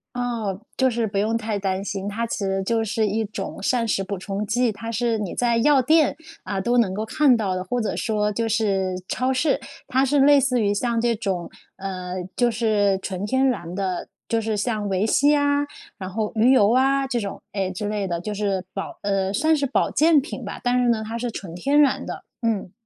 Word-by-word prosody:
哦， 230 -6 -2 0.2
就 260 0 +3
是 235 -1 -1
不 200 -2 -3
用 220 +3 +1
太 215 -2 -2
担 190 -1 -1
心， 195 -1 -4
它 225 +3 -2
其 230 - -4
实 195 -1 -1
就 225 +3 +1
是 220 0 0
一 215 +2 0
种 200 -1 -6
膳 235 +2 +1
食 195 -2 0
补 195 +1 -4
充 195 +3 -4
剂。 240 +2 +1
它 225 +2 -6
是 230 0 0
你 205 -4 -4
在 235 -1 +2
药 275 +3 +4
店， 310 +4 +3 0.3
啊， 195 -2 -3
都 240 +6 +1
能 215 -6 +3
够 215 +2 -2
看 285 +2 +4
到 195 -4 -1
的， 185 - -3
或 245 +7 -2
者 220 - -1
说 210 -2 0
就 230 +2 -1
是 195 -4 +1
超 255 +1 0
市， 270 +2 +1 0.3
它 260 +1 +2
是 280 +2 +2
类 285 +1 +7
似 255 -2 +1
于 205 -1 +2
像 235 +2 0
这 235 0 +1
种， 195 -5 -3 0.3
呃， 185 -2 -5 0.2
就 245 -1 +3
是 215 -4 +2
纯 190 -1 -4
天 260 +4 +2
然 180 -9 -2
的， 190 -2 -2 0.2
就 230 0 0
是 220 -1 -1
像 210 -1 -1
维 190 +1 +1
C 285 +6 +4
啊， 285 0 +2 0.4
然 185 -1 -5
后 210 +2 -2
鱼 225 +4 +5
油 215 -5 +5
啊， 270 +2 +3
这 250 -2 -1
种， 200 -3 -5
哎， 195 -2 -1
之 190 +3 -4
类 205 -2 -2
的， 170 -2 -2
就 210 +4 -4
是 200 -2 -1
保 195 - -5
呃， 195 -1 0
算 310 +10 +2
是 285 -2 0
保 270 - +1
健 315 0 +5
品 280 - -6
吧， - - -6
但 250 0 +2
是 245 - +2
呢， 225 -2 +1
它 230 +1 -4
是 245 +1 -2
纯 190 -6 -7
天 280 +12 +2
然 290 -2 +3
的， - - -6 0.2
嗯。 220 -6 -1
220 Hz, 240 characters per minute, -23 LUFS, 195-245 Hz, 0.4 s, 类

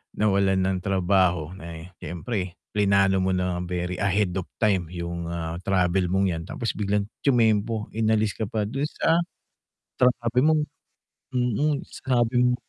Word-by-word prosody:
nawalan 100 -2 +2
ng 95 0 +1
trabaho. 90 -4 +2
Na 85 -3 -9
eh, 80 +2 -9
siyempre, 90 +2 -4 0.2
pinlano 100 -2 +3
mo 95 - +1
na 90 -1 0
very 90 0 -3
ahead 100 -1 +1
of 95 - -1 0.2
time 95 -6 +2
yung, 85 -1 -4
ah, 85 -1 -3
travel 90 -1 +2
mong 95 +1 +2
'yan, 80 -1 -4
tapos 115 - -3
biglang 100 0 0 0.2
tyumempo, 110 -4 +2
inalis 110 -1 +1
ka - - -3
pa 105 0 -1
dun 135 +6 -3
sa 165 +2 +2 0.8
sa 125 - +5 0.2
sabi 120 +2 +2
mong 155 0 +4 0.7
mm, 130 +4 +1
sinabi 120 -2 0
mo 125 - +3
100 Hz, 150 wpm, -25 LUFS, 90-110 Hz, 0.8 s, sa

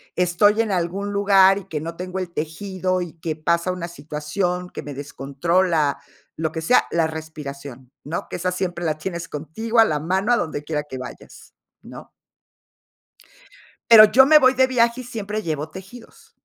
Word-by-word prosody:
estoy 180 +5 +3
en 225 -2 -2
algún 190 +3 -2
lugar, 195 -1 +5
y 195 - -13
que 150 -2 -4
no 165 +1 -6
tengo 185 +2 -5
el 180 -2 -6
tejido, 185 +3 -3
y 175 -3 -6
que 160 -1 -3
pasa 170 +3 0
una 180 -2 -5
situación 175 +3 -4
que - - -7
me 145 - -8
descontrola, 145 +3 0 0.4
lo 160 -1 -2
que 160 - -5
sea, 205 +10 +3
la 165 -1 +2
respiración, 140 -5 -9
¿no? 160 +4 -5
Que - - -5
esa 180 +1 -1
siempre 180 -1 -3
la 155 -2 -1
tienes 170 +1 -5
contigo 220 +11 -2
a 225 - +8
la 150 -7 -1
mano, 190 +8 0
a - - +3
donde 155 -6 -3
quiera 150 -1 -3
que 140 -3 -8
vayas, 125 -1 -11 0.3
¿no? - - -12 1.8
Pero, 220 -2 +11
yo 265 +1 +7
me 305 +2 +8
voy 260 -2 +4
de 260 0 +4
viaje 245 -1 +1
y - - -13
siempre 215 -3 -5
llevo 155 -3 -3
tejidos. 195 +8 -13
175 Hz, 180 wpm, -22 LUFS, 155-200 Hz, 1.8 s, Pero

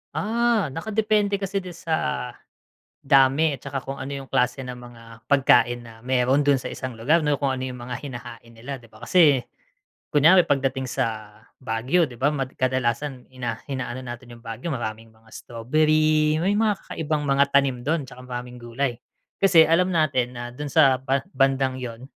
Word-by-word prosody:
Ah, 225 - +1
nakadepende 210 +3 0
kasi 195 0 -2
din 180 -2 -9
sa 155 -7 -2 0.7
dami 135 +2 +4
at - - -29
saka 135 -1 -4
kung 135 - -6
ano 135 +2 -6
yung 135 -1 -7
klase 125 +1 +1
ng 125 -1 -7
mga 120 -1 -13 0.2
pagkain 130 -3 +4
na 115 -1 -12
meron 130 +2 +2
dun 140 -2 +4
sa - - -5
isang 130 -1 -6
lugar 150 +8 +1
'no, 145 -2 +1
kung 140 - +2
ano 130 - -5
yung 125 -1 -6
mga 120 0 -6
hinahain 120 -3 -9
nila 130 +4 -7
'di 120 - -17
ba. - - -17
Kasi 150 -8 +4 0.7
kunware 165 +5 +6
pagdating 135 -1 0
sa 110 -2 -3 0.3
Baguio 130 +9 +1
'di 120 - -12
ba, 145 - +4
mad 135 -2 -3
kadalasan 130 +1 -1
ina 120 -3 -4
inaano 130 -1 -4
natin 120 0 -8
yung 115 - -20
Baguio, 115 +9 -5
maraming 115 -2 -5
mga 115 0 -24
strawberry, 155 +5 +1
may 195 +3 +2
mga 215 -2 +2
kakaibang 155 -2 -2
mga 140 0 +3
tanim 135 -2 +3
dun, 155 -2 0
'tsaka 130 -1 -12
maraming 125 0 -7
gulay. 120 +2 -2 0.5
Kasi 175 -5 +7
alam 180 +3 +3
natin 130 -6 +1
na 120 0 -5
dun 145 +2 -6
sa 135 -5 +5
ba 135 0 0
bandang 135 -1 +1
yun, 120 +1 -7
135 Hz, 175 wpm, -24 LUFS, 125-155 Hz, 0.7 s, Kasi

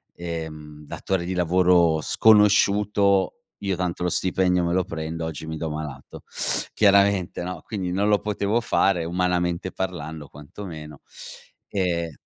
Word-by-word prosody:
ehm, 75 -3 -7
datore 95 +3 -3
di 90 - -3
lavoro 90 -2 +3
sconosciuto: 105 0 +3 0.2
"Io 100 -2 -1
tanto 90 -1 -3
lo 90 - +1
stipendio 90 0 +1
me 85 0 0
lo 95 0 +1
prendo, 80 0 -5
oggi 80 -1 -6
mi 80 0 -5
do 80 0 -3
malato." 75 -3 -7 0.5
Chiaramente, 100 -3 +3
no, 90 -2 -6
quindi 95 -5 -4
non 100 +3 0
lo 105 -1 +3
potevo 105 +2 0
fare, 95 -6 +1
umanamente 90 +1 -1
parlando 80 -5 -5
quantomeno. 75 -1 -10 0.7
E 85 -4 -1
90 Hz, 130 wpm, -24 LUFS, 80-95 Hz, 0.7 s, lavoro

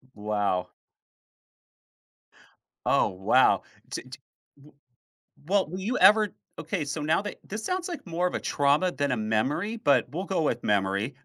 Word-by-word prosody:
W 105 - -14
wow. 100 -4 0 2.2
Oh, - - +3
wow, 95 +1 +3 0.3
di - - -5
di - - -11 0.5
w 150 - -18 0.7
well, 195 -1 +2
will 185 +3 -5
you 220 +7 -1
ever 210 -2 +6 0.3
okay, 165 +1 -2
so 145 +2 -4
now 155 +6 +2
that 205 - -6
this 215 +2 -6
sounds 365 -1 -2
like 345 - -6
more 175 +2 0
of - - -4
a - - -1
trauma 145 +5 +2
than 140 -1 -1
a - - -1
memory, 130 - -1
but 140 - +2
we'll 180 +6 -4
go 190 -3 -1
with 120 -5 -1
"memory." 100 +5 0
150 Hz, 160 wpm, -27 LUFS, -, 2.2 s, ever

